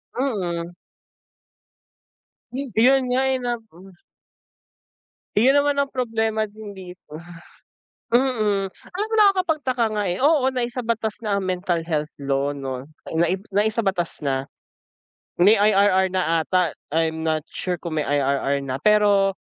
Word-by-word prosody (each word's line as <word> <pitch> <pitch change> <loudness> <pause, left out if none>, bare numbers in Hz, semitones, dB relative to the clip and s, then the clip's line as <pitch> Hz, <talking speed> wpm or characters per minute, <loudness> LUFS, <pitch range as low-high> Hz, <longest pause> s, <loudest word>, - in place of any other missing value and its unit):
Mm. 175 -10 -2 2.0
Yun 260 +4 +5
nga, 250 +1 +2
eh, 265 - +1
nap 240 -2 -3
hmm. 185 +3 -16 1.4
Yun 260 +7 +5
naman 285 0 +3
ang 280 - -2
problema 225 -4 -1
din 210 -1 -11
di 180 -1 -9 0.2
ba? 150 - -8 0.9
Mm, 215 -6 +1
alam 405 +4 -6
mo, - - -5
nakakapagtaka 320 - +2
nga, 210 -1 -1
eh, 175 - -2
oo, 280 0 +3
naisabatas 235 -4 -2
na 210 -3 0
ang 195 - -3
mental 180 -2 -1
health 155 -2 -1
law, 140 0 -1
'no? 135 0 -6 0.2
Naibs 175 +4 0
naisabatas 205 -4 0
na. 135 -1 0 0.9
May 200 +5 +7
IRR 200 -2 +4
na 165 -3 +1
ata, 180 -1 +1 0.2
I'm 160 0 0
not 155 -1 0
sure 180 -1 -3
kung 160 -2 -3
may 150 - -2
IRR 140 0 +1
na, 130 -1 -4
pero 205 0 +3
200 Hz, 130 wpm, -23 LUFS, 165-240 Hz, 2.0 s, May